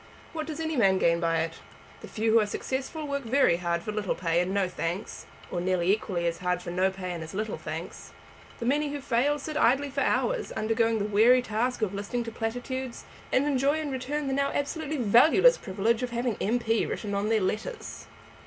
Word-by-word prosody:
What 315 -1 -4
does 315 -1 -5
any 320 -1 -2
man 195 -6 +4
gain 170 -2 +3
by 165 -1 +1
it? 165 0 -4 0.4
The - - -10
few 220 +1 0
who 225 - +6
are 210 - +1
successful 270 +7 -4
work 280 0 -2
very 240 -7 +3
hard 170 -1 -1
for 215 - -3
little 210 -2 -2
pay 170 -1 0
and 180 +1 -2
no 195 -1 +1
thanks, 180 +2 -4 0.2
or 175 - -2
nearly 185 0 +2
equally 185 -5 -2
hard 180 +1 -2
for 175 - -5
no 185 +2 +2
pay 190 -1 -6
and 170 -2 -5
as 160 +3 -9
little 215 +2 -3
thanks. - - -7 0.5
The 235 - -5
many 290 +4 +1
who 290 0 -4
fail 275 +2 +1
sit 305 +1 -6
idly 275 +2 +3
for 275 +1 -1
hours, - - 0
undergoing 225 +1 +1
the 205 - -1
weary 225 +5 +5
task 235 +2 -1
of 200 -2 -1
listening 205 +4 -3
to 230 - -6
platitudes, 245 +3 -4 0.3
and 265 - +3
enjoy 285 +1 +2
in 300 -2 -3
return 275 +3 -3
the 270 - -1
now 280 +1 +1
absolutely 305 +1 -2
valueless 255 - +5
privilege 220 +4 0
of 250 - -2
having 240 -1 -1
M.P. 225 0 +1
written 205 -2 -4
on 200 +2 0
their 225 -1 +3
letters." 215 - -4
225 Hz, 210 wpm, -27 LUFS, 190-275 Hz, 0.5 s, who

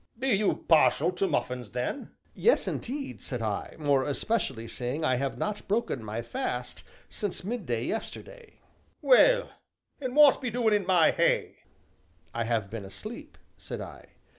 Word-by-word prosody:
"Be 265 +3 -1
you 210 -3 +1
partial 165 +2 +4
to 195 +2 0
muffins, 125 - -2
then?" 125 - -3 0.2
"Yes, 475 - +3
indeed," 275 +3 -4
said 125 -4 -4
I, 105 -2 -3
"more 145 -3 +2
especially 140 - -2
seeing 125 +7 -3
I 130 -5 +2
have 130 -2 -2
not 210 +8 -3
broken 210 - -1
my 110 +2 -4
fast 125 +1 -4 0.2
since 205 -4 -3
midday 180 - -2
yesterday." 470 - -6 0.4
"Well, - - +5 0.5
an' 260 -2 -4
w'at 295 -2 +7
be 255 - -2
doin' 230 -2 +1
in 205 -3 +1
my 180 -4 +5
hay?" - - +1 0.8
"I 115 -1 -1
have 110 -4 -1
been 115 -2 -5
asleep," 215 - -9 0.2
said - - -7
I. - - -9
165 Hz, 150 wpm, -28 LUFS, -, 0.8 s, w'at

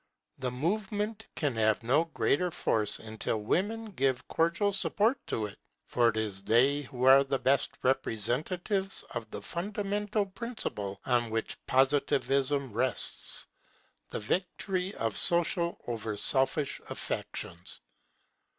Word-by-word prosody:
The 125 - -1
movement 205 - -2
can 145 -4 0
have 110 0 +2
no 140 +8 +3
great 170 +1 0
force 105 -2 +1
until 110 0 -3
women 210 - -1
give 135 -6 0
cordial 175 +5 +1
support 215 +6 +1
to 110 - -1
it; 105 -1 -9 0.3
for 120 -1 +3
it 110 - -3
is 105 -3 -2
they 130 +8 +3
who 130 -2 -6
are 135 +1 +8
the 135 0 -1
best 135 +1 +2
representatives 135 - 0
of 110 - -5
the 100 - -7
fundamental 205 - -2
principle 195 - -4
on 120 -2 +1
which 115 0 -3
Positivism 135 -1 +2
rests, 125 +3 0 0.6
the - - -4
victory 185 - -2
of 115 -2 -2
social 170 0 +3
over 110 -3 -3
selfish 135 +5 +3
affections. 85 +1 -5
135 Hz, 125 wpm, -30 LUFS, 115-185 Hz, 0.6 s, are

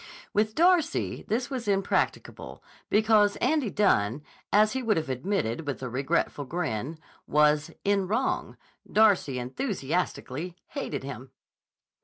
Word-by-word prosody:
With 215 +1 +1
Darcy 340 -1 +2
this 240 +5 -1
was 250 -5 -4
impracticable 195 -1 -1 0.3
because 210 -1 +4
Andy 275 -2 +1
Dunne, 145 - +2 0.3
as 215 +1 +5
he 260 - -1
would 220 -6 +1
have 155 -4 -2
admitted 135 - -2
with 135 -2 -4
a 130 - -3
regretful 135 +2 -1
grin, 155 -2 -3 0.3
was 150 +1 +3
"in 200 -2 +1
wrong." 230 +7 -1 0.3
Darcy 205 -11 +4
enthusiastically 160 - -3
hated 155 - -4
him. 135 -1 -7
190 Hz, 120 wpm, -27 LUFS, 140-220 Hz, 0.3 s, as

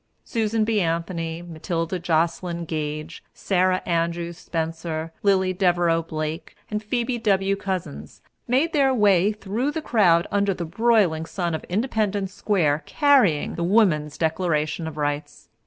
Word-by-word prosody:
Susan 220 -1 0
B. 215 -1 +1
Anthony, 165 0 -2
Matilda 170 +1 -3
Joslyn 170 +1 -1
Gage, 155 0 -4
Sara 185 -1 +1
Andrews 170 0 -1
Spencer, 165 0 -4
Lillie 190 -2 +2
Devereux 175 -3 +2
Blake, 155 +1 -5 0.2
and 210 0 -1
Phoebe 240 +3 -2
W. 195 -3 +2
Couzins 185 -6 -5 0.3
made 270 +7 +2
their 270 -3 +3
way 200 -3 +4
through 215 +5 -2
the 295 - -3
crowds 185 - +3
under 200 -1 +1
the 175 - -4
broiling 180 -4 +2
sun 170 0 -2
of 160 - -3
Independence 205 -2 -1
Square, 160 -10 +1
carrying 265 - +3
the 170 - -3
Woman's 170 -7 +2
Declaration 160 -1 -1
of 155 -1 -7
Rights. 145 0 -3
175 Hz, 135 wpm, -23 LUFS, 165-205 Hz, 0.3 s, way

